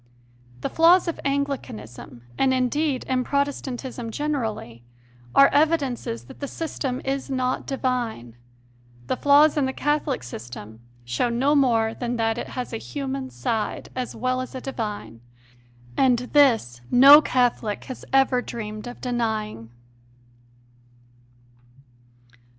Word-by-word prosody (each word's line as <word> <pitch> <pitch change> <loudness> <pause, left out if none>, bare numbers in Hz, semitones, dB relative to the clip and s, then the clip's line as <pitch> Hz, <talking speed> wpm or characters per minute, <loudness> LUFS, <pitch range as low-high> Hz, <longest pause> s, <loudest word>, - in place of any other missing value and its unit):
The - - -2
flaws 345 +3 +5
of 335 - -3
Anglicanism, 145 - -4
and 260 - +2
indeed 260 +2 0
in 255 -1 0
Protestantism 265 -3 -3
generally, 220 - -3 0.5
are 275 - +8
evidences 280 - 0
that 120 - -14
the 280 - -4
system 275 -5 -4
is 270 0 -2
not 255 -1 -1
divine; 240 - -2 0.7
the - - -1
flaws 290 +3 +5
in 275 -3 +2
the 265 - -3
Catholic 295 -1 -1
system 115 -2 -9 0.3
show 120 - 0
no 260 +5 +2
more 230 -6 +3
than 245 +1 -3
that 225 0 0
it - - -5
has 250 -2 -5
a - - -1
human 270 +1 -5
side 230 -5 -3
as 255 -1 -4
well 255 +2 -1
as 255 - -7
a 260 - -5
divine, 210 - -5 0.7
and 255 -2 +4 0.2
this 230 - +3
no 280 +4 +9
Catholic 245 -6 0
has 260 - -8
ever 270 -2 +3
dreamed 215 -1 -6
of 245 - -9
denying. 220 - -2
255 Hz, 125 wpm, -24 LUFS, 220-275 Hz, 0.7 s, no